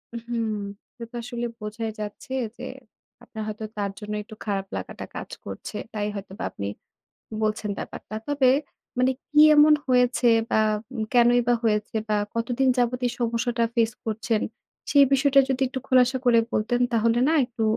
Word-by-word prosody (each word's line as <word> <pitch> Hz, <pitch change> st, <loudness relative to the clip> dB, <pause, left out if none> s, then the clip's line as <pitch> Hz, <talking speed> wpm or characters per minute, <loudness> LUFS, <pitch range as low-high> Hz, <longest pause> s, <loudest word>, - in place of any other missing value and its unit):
উম-হুম। 235 Hz, -1 st, -3 dB, 0.6 s
এটা 230 Hz, +1 st, -10 dB
আসলে 240 Hz, 0 st, -4 dB
বোঝাই 220 Hz, +1 st, -4 dB
যাচ্ছে 210 Hz, +5 st, -6 dB, 0.2 s
যে -, -, -9 dB, 0.6 s
আপনার 220 Hz, -1 st, -7 dB
হয়তো 215 Hz, 0 st, -5 dB
তার 200 Hz, -1 st, -1 dB
জন্য 210 Hz, -1 st, -6 dB
একটু 215 Hz, +1 st, -12 dB
খারাপ 195 Hz, -2 st, -2 dB
লাগাটা -, -, -6 dB
কাজ -, -, -6 dB, 0.2 s
করছে, -, -, -6 dB, 0.2 s
তাই 210 Hz, -1 st, -1 dB
হয়তোবা 195 Hz, -1 st, -7 dB
আপনি 100 Hz, -, -5 dB, 0.8 s
বলছেন 215 Hz, -1 st, -1 dB
ব্যাপারটা। -, -, -7 dB
তবে 285 Hz, -3 st, +3 dB, 0.5 s
মানে 255 Hz, +1 st, +4 dB, 0.2 s
কি 300 Hz, 0 st, +4 dB, 0.2 s
এমন 300 Hz, +1 st, +8 dB
হয়েছে? 250 Hz, 0 st, +3 dB, 0.2 s
বা -, -, +3 dB, 0.4 s
উম 225 Hz, -, -2 dB
কেনই 245 Hz, 0 st, +5 dB
বা 245 Hz, -, +5 dB
হয়েছে 210 Hz, -1 st, 0 dB
বা 210 Hz, -, +2 dB, 0.2 s
কতদিন 245 Hz, +3 st, +1 dB
যাবৎ 245 Hz, 0 st, +1 dB
এই 240 Hz, -, -1 dB
সমস্যাটা 235 Hz, 0 st, 0 dB
ফেইস 230 Hz, -1 st, +2 dB
করছেন? 220 Hz, 0 st, -1 dB, 0.5 s
সেই 285 Hz, -1 st, +7 dB
বিষয়টা 275 Hz, 0 st, +5 dB
যদি 265 Hz, 0 st, -1 dB
একটু 260 Hz, -, -4 dB
খোলাসা 255 Hz, 0 st, +4 dB
করে 240 Hz, -2 st, +5 dB
বলতেন 240 Hz, +3 st, 0 dB
তাহলে 230 Hz, +1 st, +2 dB
না -, -, +3 dB
একটু 240 Hz, -2 st, -6 dB
235 Hz, 160 wpm, -25 LUFS, 215-250 Hz, 0.8 s, এমন